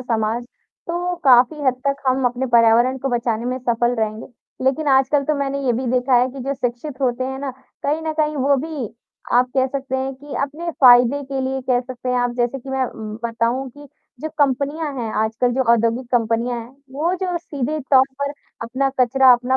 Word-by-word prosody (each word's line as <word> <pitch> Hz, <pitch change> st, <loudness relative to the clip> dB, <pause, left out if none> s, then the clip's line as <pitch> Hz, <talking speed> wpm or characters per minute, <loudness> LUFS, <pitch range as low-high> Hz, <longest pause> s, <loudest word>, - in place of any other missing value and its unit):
समाज, 230 Hz, -1 st, -1 dB, 0.4 s
तो 355 Hz, +1 st, -2 dB
काफ़ी 255 Hz, +3 st, +5 dB
हद 260 Hz, -2 st, +3 dB
तक 275 Hz, 0 st, 0 dB
हम 260 Hz, 0 st, +2 dB
अपने 245 Hz, +2 st, -1 dB
पर्यावरण 235 Hz, +3 st, +5 dB
को 270 Hz, -, -2 dB
बचाने 235 Hz, -1 st, -2 dB
में 255 Hz, +1 st, -2 dB
सफल 240 Hz, -1 st, 0 dB
रहेंगे। 220 Hz, -1 st, -3 dB, 0.4 s
लेकिन 270 Hz, +4 st, +1 dB
आजकल 270 Hz, +1 st, +3 dB
तो 305 Hz, +2 st, +1 dB
मैंने 280 Hz, 0 st, -1 dB
ये 245 Hz, -, +3 dB
भी 250 Hz, +3 st, -2 dB
देखा 255 Hz, +1 st, +2 dB
है 250 Hz, -, +2 dB
कि 270 Hz, +1 st, -9 dB
जो 275 Hz, +2 st, -2 dB
शिक्षित 260 Hz, +2 st, -4 dB
होते 255 Hz, -1 st, 0 dB
हैं 265 Hz, +1 st, -4 dB
ना, 275 Hz, 0 st, -3 dB, 0.3 s
कहीं 300 Hz, +3 st, 0 dB
न 315 Hz, 0 st, -2 dB
कहीं 300 Hz, 0 st, 0 dB
वो 280 Hz, +1 st, +3 dB
भी 290 Hz, -4 st, -4 dB, 0.4 s
आप 250 Hz, +1 st, +4 dB
कह 260 Hz, -, +4 dB
सकते 265 Hz, 0 st, -3 dB
हैं 265 Hz, +1 st, -3 dB
कि 285 Hz, +2 st, -10 dB
अपने 310 Hz, +5 st, -4 dB
फ़ायदे 250 Hz, +2 st, +6 dB
के 270 Hz, 0 st, -3 dB
लिए 265 Hz, 0 st, -2 dB
कह 250 Hz, -1 st, +1 dB
सकते 255 Hz, 0 st, -7 dB
हैं 250 Hz, -, +1 dB
आप, 245 Hz, 0 st, +1 dB
जैसे 245 Hz, +2 st, 0 dB
कि 270 Hz, +1 st, -13 dB
मैं 265 Hz, -1 st, 0 dB
उम 215 Hz, -1 st, -7 dB
बताऊँ 235 Hz, +3 st, -1 dB
कि 290 Hz, +3 st, -14 dB, 0.3 s
जो 315 Hz, -, -3 dB
कंपनियाँ 285 Hz, +2 st, 0 dB
हैं 230 Hz, -2 st, -3 dB
आजकल, 225 Hz, +3 st, 0 dB
जो 260 Hz, +2 st, +1 dB
औद्योगिक 230 Hz, +2 st, +1 dB
कंपनियाँ 235 Hz, +1 st, +1 dB
हैं, 230 Hz, -, -10 dB, 0.2 s
वो 320 Hz, +6 st, 0 dB
जो 365 Hz, -1 st, -2 dB
सीधे 300 Hz, -2 st, -3 dB
तौर 265 Hz, -1 st, +7 dB, 0.2 s
पर 280 Hz, 0 st, 0 dB, 0.3 s
अपना 260 Hz, +4 st, -1 dB
कचरा, 255 Hz, +1 st, +6 dB
अपना 250 Hz, +2 st, +2 dB
260 Hz, 205 wpm, -20 LUFS, 245-275 Hz, 0.4 s, तौर